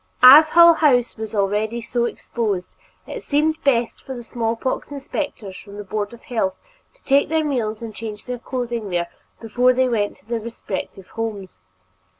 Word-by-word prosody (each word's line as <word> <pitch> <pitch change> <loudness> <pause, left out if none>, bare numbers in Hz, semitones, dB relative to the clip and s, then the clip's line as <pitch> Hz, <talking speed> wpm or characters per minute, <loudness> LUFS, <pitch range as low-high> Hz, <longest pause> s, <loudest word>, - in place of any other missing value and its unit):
As 295 +5 +10
Hull 340 +1 +8
House 255 -7 +2
was 220 -1 -6
already 210 +3 0
so 235 +1 -1
exposed, 210 -6 -3 0.3
it - - -7
seemed 315 +2 0
best 240 -4 +1
for 265 - -7
the 240 - -8
special 235 +1 -12 0.2
smallpox 255 +3 -3
inspectors 275 -8 -5
from 200 +1 -11
the 205 - -6
Board 205 +1 -3
of 235 - -14
Health 220 -6 -1 0.4
to - - -30
take 280 +1 +3
their 320 0 +1
meals 230 -6 -2
and 225 -2 -6
change 210 -1 -7
their 250 -1 -5
clothing 240 -4 -4
there 175 -1 -1 0.3
before 245 +3 +2
they 255 +1 +2
went 210 -4 -1
to - - -28
their 230 +1 -2
respective 200 -4 -7
homes. 205 - -5
235 Hz, 175 wpm, -21 LUFS, 210-260 Hz, 0.4 s, As